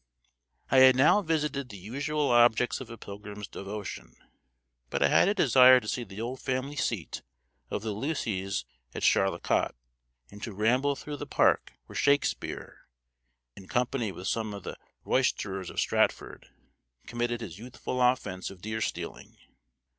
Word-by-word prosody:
I 135 Hz, -, +5 dB
had 130 Hz, -1 st, +8 dB
now 145 Hz, +10 st, +5 dB
visited 150 Hz, -6 st, -1 dB
the 105 Hz, -, -9 dB
usual 140 Hz, -, -2 dB
objects 120 Hz, +1 st, +4 dB
of 125 Hz, -, -8 dB
a 115 Hz, -, -8 dB
pilgrim's 105 Hz, 0 st, -8 dB
devotion, 100 Hz, +2 st, -7 dB, 0.7 s
but -, -, 0 dB
I -, -, +4 dB
had -, -, +5 dB
a 205 Hz, -, +2 dB
desire 130 Hz, -, +7 dB
to 110 Hz, -, -11 dB
see 120 Hz, -, -2 dB
the 100 Hz, -2 st, -10 dB
old 125 Hz, +3 st, -4 dB
family 130 Hz, +3 st, -2 dB
seat 110 Hz, -, -2 dB, 0.5 s
of 105 Hz, -, -3 dB
the 110 Hz, -, -2 dB
Lucys 100 Hz, -, -2 dB, 0.3 s
at -, -, -4 dB
Charlecot, 95 Hz, -9 st, +2 dB, 0.6 s
and 105 Hz, -, -12 dB
to 110 Hz, -, -5 dB
ramble 125 Hz, +8 st, +2 dB
through 145 Hz, +1 st, -7 dB
the -, -, -7 dB
park -, -, +2 dB
where -, -, -13 dB
Shakespeare, 145 Hz, 0 st, 0 dB, 0.7 s
in 95 Hz, -, -12 dB
company 120 Hz, -2 st, -1 dB
with 90 Hz, +1 st, -7 dB
some 110 Hz, -2 st, -1 dB
of 100 Hz, -, -9 dB
the -, -, -6 dB, 0.3 s
roisterers 95 Hz, -2 st, 0 dB
of -, -, -4 dB
Stratford, -, -, 0 dB, 0.6 s
committed 120 Hz, 0 st, -2 dB
his 95 Hz, -5 st, -7 dB
youthful 125 Hz, +1 st, -5 dB
offence 115 Hz, -7 st, +1 dB
of 95 Hz, -, -12 dB
deer 110 Hz, +3 st, -4 dB
stealing. -, -, -5 dB
120 Hz, 155 wpm, -29 LUFS, 100-130 Hz, 0.7 s, had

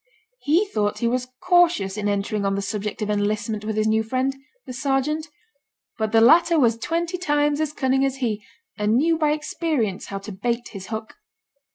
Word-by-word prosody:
He 335 Hz, +5 st, +2 dB
thought 210 Hz, -, -1 dB
he 235 Hz, -, 0 dB
was 250 Hz, +1 st, -1 dB, 0.2 s
cautious 350 Hz, -, +3 dB
in 205 Hz, -1 st, -1 dB
entering 205 Hz, +1 st, -1 dB
on 195 Hz, 0 st, 0 dB
the 200 Hz, -, -1 dB
subject 210 Hz, +2 st, -3 dB
of 210 Hz, -, -1 dB
enlistment 210 Hz, +1 st, -1 dB
with 215 Hz, 0 st, -3 dB
his 215 Hz, -, +2 dB
new 220 Hz, 0 st, +3 dB
friend, 255 Hz, +4 st, -1 dB, 0.3 s
the 255 Hz, -, -7 dB
sergeant; 275 Hz, +4 st, -1 dB, 0.7 s
but 220 Hz, -1 st, 0 dB
the 225 Hz, 0 st, +5 dB
latter 335 Hz, +7 st, +6 dB
was 235 Hz, -4 st, +4 dB
twenty 340 Hz, +7 st, -2 dB
times 295 Hz, -2 st, +1 dB
as 310 Hz, -2 st, -1 dB
cunning 265 Hz, -2 st, +1 dB
as 270 Hz, -1 st, 0 dB
he, 225 Hz, -5 st, -2 dB, 0.4 s
and 210 Hz, +1 st, +2 dB
knew 325 Hz, +4 st, +2 dB
by 305 Hz, -2 st, +3 dB
experience 300 Hz, -, -2 dB
how 195 Hz, -, -4 dB
to 195 Hz, +2 st, -8 dB
bait 235 Hz, +5 st, -2 dB
his 195 Hz, -3 st, -9 dB
hook. 220 Hz, -, -6 dB
235 Hz, 190 wpm, -23 LUFS, 210-300 Hz, 0.7 s, latter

